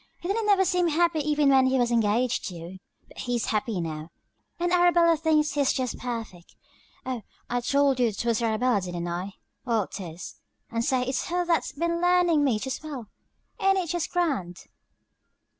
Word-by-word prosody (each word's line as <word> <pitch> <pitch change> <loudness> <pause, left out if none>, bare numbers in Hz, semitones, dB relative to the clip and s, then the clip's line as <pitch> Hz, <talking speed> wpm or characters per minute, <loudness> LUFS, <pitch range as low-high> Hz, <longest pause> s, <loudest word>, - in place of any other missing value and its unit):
He 345 - -6
didn't 420 +3 0
never 390 -2 +4
seem 360 -1 +2
happy 335 0 +2
even 295 -1 +2
when 265 -1 +5
he 260 0 +2
was 245 -1 +1
engaged 230 +2 +1
to 180 - -7
you. 170 +3 -9 0.3
But - - -14
hes 245 -2 -1
happy 215 -2 -1
now, 160 -1 -5 0.5
and 350 0 0
Arabella 345 -1 +5
thinks 305 -2 +1
hes 285 -2 +2
jest 255 -2 -3
perfect. 225 -8 -6 0.5
Oh, 255 -3 -3 0.3
I 245 0 0
told 280 +1 +2
you 240 -2 +3
twas 230 +2 -1
Arabella 230 -1 +1
didn't 175 -1 -4
I? 180 +3 -4 0.3
Well, 230 -5 +1
tis. 175 -3 -8 0.3
And 230 0 -1
say 255 +1 +1
its 260 +1 -2
her 355 +1 0
thats 335 -1 0
been 340 +2 -1
learnin 355 -4 +3
me 255 -6 +2
to 265 - -3
spell. 265 -6 -6 0.5
Ain't 390 0 +3
it 360 -4 -2
jest 345 -2 -2
grand?" 265 - -2
260 Hz, 175 wpm, -26 LUFS, 220-335 Hz, 0.5 s, when